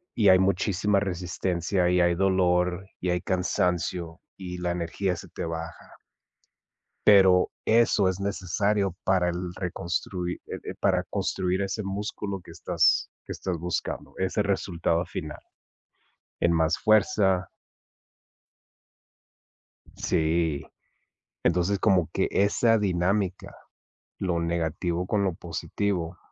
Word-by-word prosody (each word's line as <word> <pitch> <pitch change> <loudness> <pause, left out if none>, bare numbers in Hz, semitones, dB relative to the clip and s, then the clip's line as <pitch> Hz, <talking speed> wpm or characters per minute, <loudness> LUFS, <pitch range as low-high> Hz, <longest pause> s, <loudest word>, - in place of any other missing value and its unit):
y 105 -4 +4
hay 95 0 +7
muchísima 100 +1 +2
resistencia, 90 -1 -1
y 90 0 +3
hay 85 0 +3
dolor, 90 0 +1
y 90 - -2
hay 90 0 0
cansancio, 90 -2 -1 0.2
y 90 -2 -6
la 90 0 -1
energía 90 +2 -2
se 85 - -10
te - - -5
baja 80 0 -7 1.1
pero 95 -3 +6 0.2
eso 110 -3 +4
es 95 0 -3
necesario 100 0 0
para 90 -2 +2
el 90 0 -4
reconstruir, 90 0 -3
eh - - -5
eh, - - -10
para - - +2
construir 95 0 -1
ese 100 +2 -2
músculo 100 0 -4
que - - -12
estás - - +2 0.2
que - - -8
estás 90 -3 -3
buscando, 90 +2 -4
ese 95 +3 0
resultado 90 -3 0
final, 75 -3 -6 1.0
en 85 - +3
más 80 0 +2
fuerza 100 -3 +3 2.5
Sí. 80 -2 0 0.8
Entonces, 90 +4 +2
como 95 -6 +3
que - - +1
esa 115 +3 +3
dinámica, 95 -1 -1 0.6
lo 90 -3 0
negativo 85 +1 -1
con 105 0 +1
lo 95 -3 0
positivo 85 +1 -3
90 Hz, 115 wpm, -26 LUFS, 85-100 Hz, 2.5 s, hay